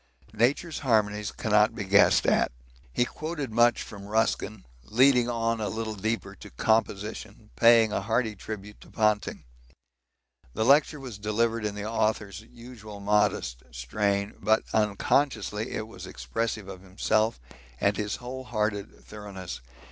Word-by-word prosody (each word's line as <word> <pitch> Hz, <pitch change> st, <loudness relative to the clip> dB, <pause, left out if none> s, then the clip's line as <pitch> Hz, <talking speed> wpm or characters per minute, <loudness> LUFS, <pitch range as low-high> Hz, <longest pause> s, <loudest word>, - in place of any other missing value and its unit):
Nature's 135 Hz, +9 st, +1 dB
harmonies 105 Hz, -6 st, +1 dB
cannot 105 Hz, -1 st, +2 dB
be 105 Hz, -, -3 dB
guessed 100 Hz, +1 st, +5 dB
at. -, -, +3 dB, 0.4 s
He 120 Hz, -, +2 dB
quoted 155 Hz, -3 st, -5 dB
much 120 Hz, +1 st, +3 dB
from 100 Hz, -2 st, -10 dB
Ruskin, 110 Hz, -1 st, -1 dB, 0.2 s
leading 125 Hz, -, +4 dB
on 115 Hz, -1 st, 0 dB
a 105 Hz, -, -1 dB
little 110 Hz, +2 st, -3 dB
deeper 110 Hz, +3 st, -3 dB
to -, -, -11 dB
'Composition,' 105 Hz, -, -1 dB
paying 115 Hz, -2 st, +6 dB
a -, -, 0 dB
hearty 110 Hz, +1 st, 0 dB
tribute 105 Hz, 0 st, -8 dB
to -, -, -15 dB
Ponting. 105 Hz, -2 st, 0 dB, 1.1 s
The 110 Hz, -, 0 dB
lecture 145 Hz, +3 st, +4 dB
was 125 Hz, -7 st, -8 dB
delivered 110 Hz, +1 st, 0 dB
in 105 Hz, -1 st, -2 dB
the 105 Hz, 0 st, -5 dB
author's 110 Hz, -3 st, -1 dB
usual 115 Hz, -2 st, -11 dB
modest 100 Hz, -12 st, +1 dB
strain, 100 Hz, -, -1 dB
but 110 Hz, +1 st, +2 dB
unconsciously 110 Hz, +1 st, +1 dB
it 110 Hz, -, -4 dB
was 95 Hz, -4 st, -10 dB
expressive 115 Hz, 0 st, -3 dB
of 95 Hz, -2 st, -9 dB
himself 110 Hz, -, 0 dB, 0.4 s
and 100 Hz, 0 st, +2 dB
his 105 Hz, 0 st, -2 dB
whole 130 Hz, +1 st, -7 dB
hearted 105 Hz, -3 st, -3 dB
thoroughness. 95 Hz, -, -8 dB
110 Hz, 140 wpm, -27 LUFS, 105-115 Hz, 1.1 s, paying